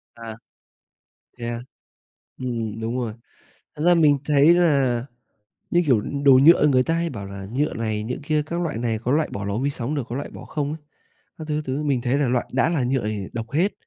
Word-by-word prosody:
À. 115 -1 -8 1.0
Thế 120 - -5
à? 120 0 -4 0.8
Ừm, 115 -4 -4
đúng 115 +2 -3
rồi, 120 -4 -3 0.6
thật 150 - -4
ra 175 - +6
mình 150 -4 +4
thấy 150 +3 +5
là, 140 -8 +2 0.7
như 175 - +4
kiểu, 125 -7 +3
đồ 140 +3 +3
nhựa 160 -2 +7
người 130 -3 +4
ta 165 - 0
hay 170 0 0
bảo 105 -6 -7
là 100 0 -8
nhựa 145 +3 0
này, 110 -2 -2
nhựa 125 +3 -3
kia 150 +1 +1
các 170 +2 -3
loại 165 -9 -2
này, 115 -2 -1
có 120 +3 -2
loại 155 +2 +2
bỏ 100 - -4
lò 100 +1 -2
vi 135 +4 0
sóng 135 +1 -3
được, 140 - -1
có 120 - -4
loại 140 - -4
bỏ - - -11
không 145 -1 -3
á, - - -6 0.6
các 160 - -6
thứ, 150 - -1
các 155 - -2
thứ 135 +3 -2
mình 140 -4 0
thấy 125 +3 0
là 140 - +1
loại 120 0 0
đã 135 +4 +2
là 145 -7 0
nhựa 130 -1 0
thì 105 -3 -3
độc 115 0 -5
hết, 175 +8 +2
130 Hz, 230 wpm, -23 LUFS, 115-150 Hz, 1.0 s, nhựa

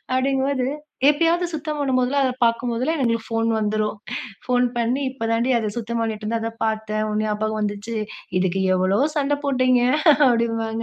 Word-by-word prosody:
அப்படிங்கும்போது 265 0 +1 0.4
எப்பயாவது 335 +3 +2
சுத்தம் 305 0 -3
பண்ணும்போதுலாம், 265 0 +1
அத 255 - 0
பார்க்கும்போதெல்லாம் 245 +6 -1
எங்களுக்கு 230 -2 0
ஃபோன் 225 0 0
வந்துரும். 215 0 -1 0.5
ஃபோன் 250 0 +3
பண்ணி 245 +4 0
இப்பதாண்டி 230 -1 -1
அத 215 -2 -3
சுத்தம் 235 +1 -3
பண்ணிட்டுருந்தேன். 220 0 -2
அத 225 - -3
பார்த்தேன் 215 -1 -2
உன் 210 0 0
ஞாபகம் 215 +1 -1
வந்துச்சு. 205 +2 -3 0.4
இதுக்கு 190 +1 0
எவ்வளோ 185 +4 +2 0.2
சண்டை 290 0 +1
போட்டீங்க 255 -2 +3 0.5
அப்படிம்பாங்க. 230 -1 -1
230 Hz, 140 wpm, -22 LUFS, 215-260 Hz, 0.5 s, ஃபோன்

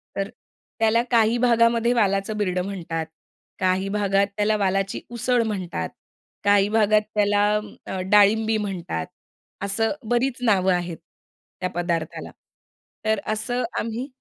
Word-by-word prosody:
तर 195 +1 -2 0.5
त्याला 225 +1 +4
काही 230 0 +4
भागामध्ये 235 0 +3
वालाचं 200 -2 +1
बिरडं 185 -3 0
म्हणतात, 170 -5 -4 0.5
काही 185 +1 +1
भागात 200 -1 +2
त्याला 210 +1 +2
वालाची 195 0 0
उसळ 240 0 +1
म्हणतात, 180 - -3 0.5
काही 205 0 +4
भागात 215 -1 +4
त्याला 205 0 +3
अं, 190 -3 -6
डाळिंबी 215 +2 +4
म्हणतात. 175 - -4 0.5
असं 200 +3 0 0.2
बरीच 245 +1 +1
नावं 190 -4 +3
आहेत, 175 -2 -2 0.6
त्या 185 - -1
पदार्थाला. 170 -2 -2 0.7
तर 220 -1 +2
असं 245 +3 -2 0.2
आम्ही 230 +4 -3
205 Hz, 120 wpm, -23 LUFS, 190-225 Hz, 0.7 s, त्याला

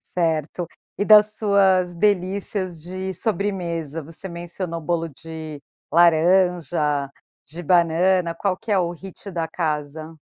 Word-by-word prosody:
Certo. 165 0 -1 0.3
E - - +1
das 215 0 +6
suas 190 -4 +3
delícias 185 -2 -1
de 185 +1 -5
sobremesa, 170 -7 -2
você 165 +5 -9
mencionou 170 0 -5
bolo 165 +1 -1
de 155 0 -9 0.3
laranja, 170 -4 +3 0.4
de 170 +3 -8
banana, 175 +1 +3
qual 195 -2 0
que 215 - -7
é 200 - +4
o 175 -2 +1
hit 190 +3 -9
da 165 -2 -2
casa? 155 -1 -3
175 Hz, 125 wpm, -22 LUFS, 160-190 Hz, 0.4 s, das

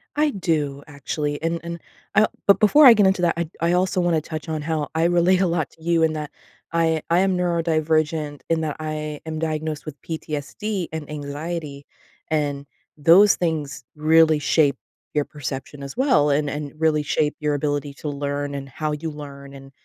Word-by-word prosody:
I 300 0 +3
do, 150 -7 -1
actually, 145 +1 -4
and 165 +1 -1
and 170 0 -6 0.4
I 215 0 +6 0.2
but 200 - +6
before 285 +8 +6
I 245 - +11
get 205 -3 +4
into 190 -1 +1
that, 170 - +3
I 170 -2 -2
I 170 +1 +2
also 180 0 +1
wanna 170 -3 +1
touch 155 0 -7
on 155 -1 -2
how 155 -1 -2
I 160 - +2
relate 175 +2 +3
a 185 - +3
lot 165 -3 -1
to 160 - -20
you 170 -1 +2
in 160 -1 +2
that 150 -1 -5 0.4
I 165 -2 +1
I 170 +2 +4
am 190 -1 +2
neurodivergent 160 -3 0
and 165 -1 +1
that 150 -2 -2
I 155 -1 -4
am 155 -1 -4
diagnosed 155 -1 -3
with 150 -2 -9
PTSD 165 +5 -4
and 160 -2 -6
anxiety, 145 0 -5 0.4
and 145 -2 -1 0.3
those 180 +7 +6
things 150 -6 -2
really 155 0 +4
shape 145 -2 +2 0.4
your 150 -1 +1
perception 140 0 -6
as 140 - -7
well 150 - +3
and 145 0 +1
and 145 0 -5
really 155 -2 +2
shape 150 +1 0
your 150 -1 0
ability 145 0 -2
to 150 - -5
learn 145 0 -3
and 135 -1 -6
how 155 +2 -3
you 155 +1 -4
learn 140 -2 -10
and, 135 0 -12
155 Hz, 185 wpm, -23 LUFS, 145-170 Hz, 0.4 s, I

